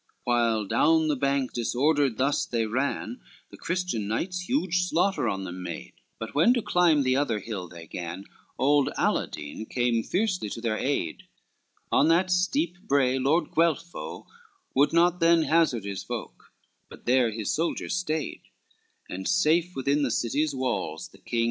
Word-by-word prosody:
XCVI - - -41
While 115 -3 +1
down 160 +9 +3
the 150 - +2
bank 140 -1 0
disordered 135 +1 +1
thus 140 +2 +1
they 115 -2 0
ran, 130 - -2 0.3
The - - -12
Christian 170 - -2
knights 180 - -3
huge 190 - +1
slaughter 180 - +1
on 95 -2 -3
them 90 0 -6
made; 85 -2 -7 0.2
But 115 - -7
when 170 - +4
to 240 - -1
climb 170 -5 +3
the 130 0 +2
other 135 -5 +1
hill 100 -3 -5
they 85 -1 -11
gan, 85 +3 -6 0.3
Old 145 +1 +3
Aladine 75 +9 -2
came 120 -2 +1
fiercely 185 - -1
to 115 - -6
their 115 -2 -1
aid: 130 - -2 0.6
On 145 - +4
that 180 +3 +3
steep 185 - +1
brae 135 -2 +2
Lord 145 +6 +1
Guelpho 165 +1 -1 0.5
would 140 +2 +3
not 175 +1 +3
than 165 -1 +4
Hazard 155 -10 +2
his 100 -1 -4
folk, - - -7 0.4
but - - -14
there 125 -1 +3
his 110 -1 -3
soldiers 165 +2 -1
stayed, 160 -4 -2 0.7
And 95 +1 -5
safe 175 0 +2
within 140 +2 +1
the 140 - +1
city's 140 +6 0
walls 125 -11 -3
the 95 - -19
king. 115 +5 -3
140 Hz, 160 wpm, -26 LUFS, 115-165 Hz, 0.7 s, when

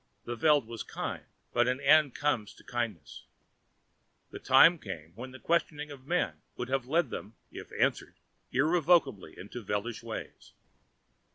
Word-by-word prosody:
The 120 - -4
Veld 150 0 +4
was 115 0 -7
kindly, - - -5 0.3
but 120 0 +3
an 125 +1 0
end 145 -1 +5
comes 125 -8 -1
to - - -18
kindness. 115 - -5 1.1
The - - -7
time 165 +6 +6
came 85 - -8
when 125 +6 -8
the 130 - -11
questioning 150 -2 -1
of 135 -1 -12
men 180 +2 0 0.2
would 125 - -4
have 130 -2 -1
led 155 -1 +1
them, 110 +3 -7 0.2
if - - -10
answered, - - 0 0.4
irrevocably 155 - +2
into 105 +6 -8
Veldish 105 +3 -3
ways. 115 -1 -8
130 Hz, 150 wpm, -30 LUFS, 115-150 Hz, 1.1 s, time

